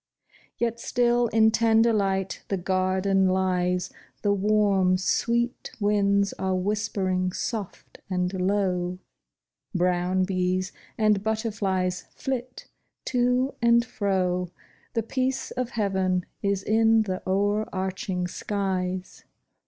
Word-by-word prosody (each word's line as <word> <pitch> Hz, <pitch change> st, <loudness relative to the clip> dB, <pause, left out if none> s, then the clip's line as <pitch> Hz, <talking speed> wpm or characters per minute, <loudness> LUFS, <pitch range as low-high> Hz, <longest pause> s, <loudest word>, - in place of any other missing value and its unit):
Yet 235 Hz, 0 st, -1 dB
still 240 Hz, -1 st, +2 dB
in 220 Hz, 0 st, +4 dB
tender 225 Hz, +1 st, +4 dB
light 195 Hz, -2 st, -1 dB
the 195 Hz, -, -1 dB
garden 190 Hz, +1 st, +1 dB
lies; 180 Hz, -1 st, 0 dB, 0.3 s
The 205 Hz, -1 st, +3 dB
warm, 200 Hz, -2 st, +3 dB
sweet 235 Hz, +5 st, 0 dB
winds 200 Hz, -1 st, +2 dB
are 190 Hz, 0 st, 0 dB
whispering 190 Hz, -2 st, -1 dB
soft 210 Hz, -3 st, -5 dB
and 180 Hz, 0 st, -1 dB
low; 185 Hz, -2 st, 0 dB, 0.8 s
Brown 180 Hz, +1 st, +1 dB
bees 185 Hz, 0 st, 0 dB, 0.3 s
and 215 Hz, -2 st, +3 dB
butterflies 200 Hz, -4 st, -1 dB
flit 255 Hz, -2 st, -4 dB, 0.4 s
to 250 Hz, +1 st, +1 dB
and 235 Hz, 0 st, +4 dB
fro; 185 Hz, -5 st, -1 dB, 0.5 s
The 230 Hz, -, +1 dB
peace 260 Hz, +3 st, -2 dB
of 250 Hz, -2 st, -2 dB
heaven 190 Hz, -5 st, 0 dB, 0.2 s
is 200 Hz, -1 st, 0 dB
in 225 Hz, 0 st, +4 dB
the 185 Hz, -3 st, -3 dB
o'erarching 190 Hz, -1 st, -1 dB
skies. 185 Hz, -1 st, -3 dB
195 Hz, 105 wpm, -26 LUFS, 185-220 Hz, 0.8 s, in